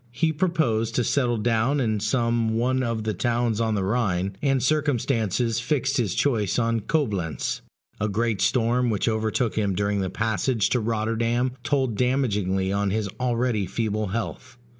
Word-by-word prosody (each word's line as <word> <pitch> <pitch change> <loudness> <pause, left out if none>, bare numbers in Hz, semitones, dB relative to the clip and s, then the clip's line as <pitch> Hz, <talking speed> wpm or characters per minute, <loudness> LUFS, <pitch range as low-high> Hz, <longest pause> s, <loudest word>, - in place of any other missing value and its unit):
He 160 +7 0
proposed 150 -10 0
to 125 - +2
settle 120 -1 +1
down 115 +5 +1
in 110 -5 0
some 115 0 +1
one 130 +3 +1
of 115 -3 -2
the 110 0 -1
towns 115 +1 0
on 110 -1 +1
the 100 - 0
Rhine, 95 -3 0
and 135 -3 +1
circumstances 120 - +1
fixed 135 +1 0
his 110 -8 0
choice 110 -9 +1
on 115 -1 +1
Coblentz. 105 - -1 0.4
A 105 - 0
great 110 -1 0
storm 120 +3 +2
which 105 -1 0
overtook 110 +1 0
him 100 -3 0
during 100 +1 0
the 95 - -1
passage 110 +3 0
to 125 - +2
Rotterdam 115 +3 0
told 130 -5 0
damagingly 105 -7 +1
on 100 0 0
his 105 0 -1
already 120 -5 0
feeble 110 +1 -1
health. 95 0 -5
115 Hz, 160 wpm, -25 LUFS, 105-125 Hz, 0.4 s, to